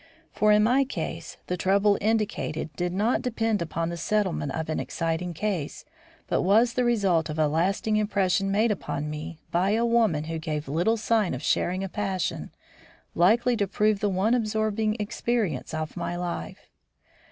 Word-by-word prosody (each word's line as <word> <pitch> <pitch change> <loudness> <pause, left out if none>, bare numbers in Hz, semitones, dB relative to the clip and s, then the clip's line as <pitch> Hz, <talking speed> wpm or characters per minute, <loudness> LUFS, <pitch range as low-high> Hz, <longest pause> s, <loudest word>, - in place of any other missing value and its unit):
For, 215 0 +3
in 210 0 +5
my 250 +5 +4
case, 270 - -5
the 180 - -2
trouble 200 +3 +3
indicated 210 -8 -1
did 175 0 -1
not 210 +7 +1
depend 225 -4 -1
upon 165 0 -2
the 170 - -5
settlement 185 -5 0
of 160 0 -3
an 155 - -2
exciting 165 +1 -2
case, 185 -5 -3 0.4
but - - 0
was 225 +6 +4
the 250 - +1
result 195 -9 +2
of 155 - -4
a 155 -1 +3
lasting 190 +7 +1
impression 195 -1 +1
made 215 +3 +2
upon 150 -6 -3
me 155 +2 -6
by 185 +4 +2
a 230 +2 +2
woman 225 -10 +2
who 160 +1 -4
gave 155 -2 -4
little 175 +11 +1
sign 215 - +1
of 130 - -7
sharing 185 +4 0
a - - -2
passion 195 -2 -3 0.6
likely 235 +8 +3
to 200 -2 0
prove 210 +1 +1
the 205 - +1
one 195 +5 +1
absorbing 215 -1 0
experience 210 - -2
of 155 -1 -4
my 175 0 -3
life. 175 - -5
195 Hz, 170 wpm, -26 LUFS, 165-215 Hz, 0.6 s, in